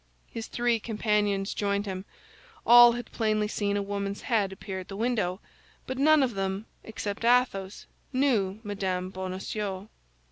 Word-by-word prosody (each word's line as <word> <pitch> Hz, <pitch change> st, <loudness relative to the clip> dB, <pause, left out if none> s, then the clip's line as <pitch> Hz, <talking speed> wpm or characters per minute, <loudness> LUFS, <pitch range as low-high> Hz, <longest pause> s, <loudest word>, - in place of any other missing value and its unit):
His 225 Hz, -1 st, -6 dB
three 240 Hz, -1 st, +1 dB
companions 210 Hz, -3 st, 0 dB
joined 200 Hz, 0 st, -1 dB
him. 190 Hz, -1 st, -5 dB, 0.6 s
All 240 Hz, 0 st, +9 dB
had 240 Hz, -1 st, -6 dB
plainly 215 Hz, -2 st, 0 dB
seen 205 Hz, -1 st, -1 dB
a 200 Hz, -, -1 dB
woman's 200 Hz, 0 st, -3 dB
head 210 Hz, -5 st, +1 dB
appear 190 Hz, 0 st, -6 dB
at 185 Hz, -, -9 dB
the 195 Hz, -, -7 dB
window, 210 Hz, -5 st, -1 dB, 0.5 s
but 260 Hz, 0 st, -4 dB
none 305 Hz, 0 st, +5 dB
of 250 Hz, -3 st, 0 dB
them, 195 Hz, +1 st, -2 dB, 0.2 s
except 220 Hz, -1 st, -5 dB
Athos, 235 Hz, -5 st, +1 dB, 0.3 s
knew 230 Hz, -8 st, +1 dB
Mme. 190 Hz, -3 st, -2 dB
Bonacieux. 190 Hz, +2 st, -5 dB
205 Hz, 145 wpm, -28 LUFS, 195-230 Hz, 0.6 s, All